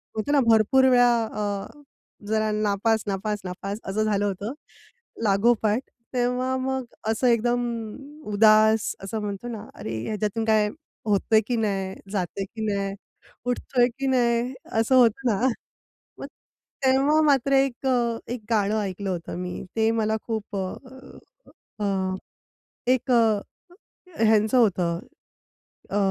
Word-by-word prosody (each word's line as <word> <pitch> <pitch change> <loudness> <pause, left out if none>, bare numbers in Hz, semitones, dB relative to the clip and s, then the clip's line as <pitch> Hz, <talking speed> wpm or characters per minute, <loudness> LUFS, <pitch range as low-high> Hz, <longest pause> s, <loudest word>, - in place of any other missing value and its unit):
म्हणतो 220 +7 -2
ना 290 - +4
भरपूर 230 +4 +5
वेळा 245 -1 +5
अ, 210 +4 -7
जरा 215 0 +1
नापास 215 +1 +1
नापास 205 +1 -2
नापास 195 +3 -5
असं 210 +3 -1
झालं 205 -1 +1
होतं 205 +5 -3 0.7
लागोपाठ 215 +2 +3 0.3
तेव्हा 250 +1 0
मग 265 0 -2 0.2
असं 225 +3 +1
एकदम 240 +1 +2 0.7
उदास 215 +1 +4
असं 205 +3 -3
म्हणतो 205 +2 -5
ना. 220 -2 -6
"अरे! 110 +1 -5
ह्याच्यातून 215 +1 -2
काय 215 -1 +3 0.4
होतय 215 +1 +3
की 245 - 0
नाही, 195 -3 -1 0.2
जातंय 195 0 -2
की 220 +2 -6
नाही, 200 -1 -1 0.5
उठतोय 245 0 +1
की 275 - -1
नाही?" 245 -1 +1 0.3
असं 245 +4 +3
होतं 245 +1 +4
ना. 195 - 0 0.8
मग - - -5 0.6
तेव्हा 275 +4 +4
मात्र 275 -1 +3
1 270 -1 +1
अ 235 -2 +1 0.2
1 245 - -6
गाणं 215 0 +2
ऐकलं 195 0 -4
होतं 175 -1 -4
मी 180 0 -5
ते 220 0 +3
मला 220 -1 0
खूप 220 -2 -4
अ, 255 - -8 1.5
एक 255 +1 +1
अ, 225 -3 +4 0.8
ह्यांचं 220 +1 +4
होतं 175 -7 +2 0.9
अ, 200 - -1
220 Hz, 125 wpm, -25 LUFS, 205-245 Hz, 1.5 s, भरपूर